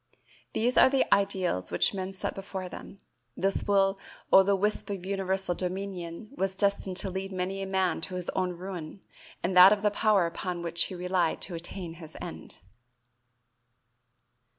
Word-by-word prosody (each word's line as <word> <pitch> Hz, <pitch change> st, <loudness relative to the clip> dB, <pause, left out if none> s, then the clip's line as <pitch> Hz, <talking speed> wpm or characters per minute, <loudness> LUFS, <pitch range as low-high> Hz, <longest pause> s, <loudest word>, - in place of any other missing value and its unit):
These 245 Hz, +3 st, +1 dB
are -, -, +8 dB
the 270 Hz, 0 st, +2 dB
ideals 185 Hz, -, 0 dB
which 90 Hz, -, +2 dB
men 190 Hz, -1 st, -4 dB
set 190 Hz, -, -4 dB
before 190 Hz, -1 st, -6 dB
them; 195 Hz, -, -10 dB, 0.4 s
this 195 Hz, +1 st, 0 dB
will 195 Hz, -1 st, +3 dB, 0.3 s
o' 190 Hz, -, +10 dB
the 200 Hz, +1 st, +2 dB
wisp 210 Hz, +2 st, 0 dB
of 195 Hz, -3 st, -4 dB
universal 190 Hz, -1 st, -1 dB
dominion 185 Hz, +1 st, -5 dB
was 190 Hz, -4 st, 0 dB
destined 200 Hz, -2 st, +1 dB
to 195 Hz, -, -1 dB
lead 190 Hz, +1 st, -4 dB
many 190 Hz, +1 st, -3 dB
a 195 Hz, -, -3 dB
man 190 Hz, -3 st, 0 dB
to 185 Hz, -, -5 dB
his 180 Hz, -1 st, -2 dB
own 185 Hz, -1 st, -1 dB
ruin 180 Hz, 0 st, -7 dB, 0.4 s
and 185 Hz, +1 st, 0 dB
that 180 Hz, +2 st, +10 dB
of 210 Hz, -1 st, +1 dB
the 210 Hz, -, +3 dB
power 210 Hz, -3 st, +3 dB
upon 175 Hz, +1 st, -4 dB
which 170 Hz, 0 st, +1 dB
he 185 Hz, -, -7 dB
relied 180 Hz, -1 st, 0 dB
to 185 Hz, -, -4 dB
attain 170 Hz, 0 st, -6 dB
his 160 Hz, -1 st, -10 dB
end. 80 Hz, 0 st, -9 dB
190 Hz, 170 wpm, -28 LUFS, 180-195 Hz, 0.4 s, o